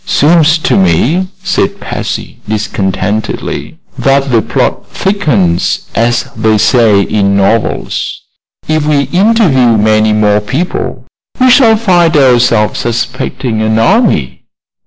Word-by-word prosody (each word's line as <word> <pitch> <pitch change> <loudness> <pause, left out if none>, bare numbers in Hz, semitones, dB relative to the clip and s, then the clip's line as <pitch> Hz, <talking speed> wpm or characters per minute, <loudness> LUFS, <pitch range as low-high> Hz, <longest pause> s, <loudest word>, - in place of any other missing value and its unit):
"Seems 155 +1 +3
to 160 - 0
me," 120 - +1 0.2
said 195 +2 -1
Patsy, - - -6
discontentedly, 105 0 -3 0.2
"that 135 0 +1
the 115 -2 +3
plot - - -2
thickens, 120 - -1
as 120 +1 0
they 110 -1 +1
say 110 -2 +3
in 100 -1 0
novels. 100 +3 -1 0.5
If 155 -1 -1
we 145 -2 +2
interview 175 - +3
many 110 0 +2
more 105 -1 +2
people 140 - -4 0.3
we 255 0 +4
shall 230 -4 +4
find 175 -7 +2
ourselves 120 -5 +2
suspecting 120 0 -3
an 110 0 0
army." 180 - +1
120 Hz, 115 wpm, -10 LUFS, 110-170 Hz, 0.5 s, we